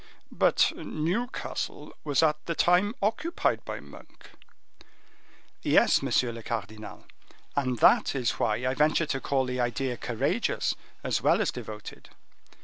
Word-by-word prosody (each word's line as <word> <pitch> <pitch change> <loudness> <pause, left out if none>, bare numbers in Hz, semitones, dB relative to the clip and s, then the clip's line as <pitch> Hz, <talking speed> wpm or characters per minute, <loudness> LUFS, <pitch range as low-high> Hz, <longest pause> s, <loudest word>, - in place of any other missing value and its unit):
"But - - +3
Newcastle 185 +11 -3
was 145 +1 +2
at 150 -1 +2
the 170 - -1
time 180 +7 +3
occupied 315 +11 0
by - - -5
Monk." - - -15 1.3
"Yes, - - +4
monsieur 125 -2 +1
le 115 0 -8
cardinal, 110 -1 -6 0.5
and 130 -3 0
that 115 - +4
is 125 -5 +1
why 110 +4 0
I 130 - +1
venture 155 +4 +2
to 135 -3 -2
call 135 -2 +1
the 125 0 -3
idea 125 +1 -1
courageous 120 -2 0 0.3
as - - 0
well - - +4
as - - +1
devoted. 105 -1 -9
135 Hz, 135 wpm, -28 LUFS, 120-160 Hz, 1.3 s, Yes